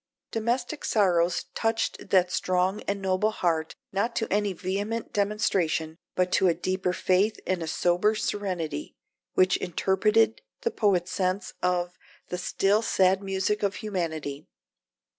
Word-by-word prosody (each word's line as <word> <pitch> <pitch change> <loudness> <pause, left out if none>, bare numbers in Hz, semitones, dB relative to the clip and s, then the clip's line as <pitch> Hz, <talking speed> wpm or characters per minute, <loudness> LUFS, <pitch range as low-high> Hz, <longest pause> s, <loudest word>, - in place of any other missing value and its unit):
Domestic 240 +6 -1
sorrows 180 -5 +2
touched 225 0 -1
that 180 -2 +4
strong 185 +2 +1
and 200 -1 -2
noble 190 +3 +2
heart 165 -6 -1 0.2
not 215 +5 0
to 225 - 0
any 205 -1 +1
vehement 200 +5 -3
demonstration, 195 -6 0 0.2
but 180 0 +1
to 190 - +4
a 170 - +3
deeper 185 +1 -1
faith 190 +4 +1
and 185 -2 -1
a 165 - -3
sober 175 +6 +2
serenity, 185 - -3 0.4
which 185 0 +4
interpreted 210 +5 +2 0.2
the 465 - 0
poet's 190 -4 +1
sense 185 +1 -1
of 180 -1 0 0.3
"the 180 - -3
still 195 +3 +2
sad 190 -3 +3
music 195 +2 -1
of 200 0 0
humanity." 160 -9 -4
190 Hz, 135 wpm, -27 LUFS, 180-210 Hz, 0.4 s, that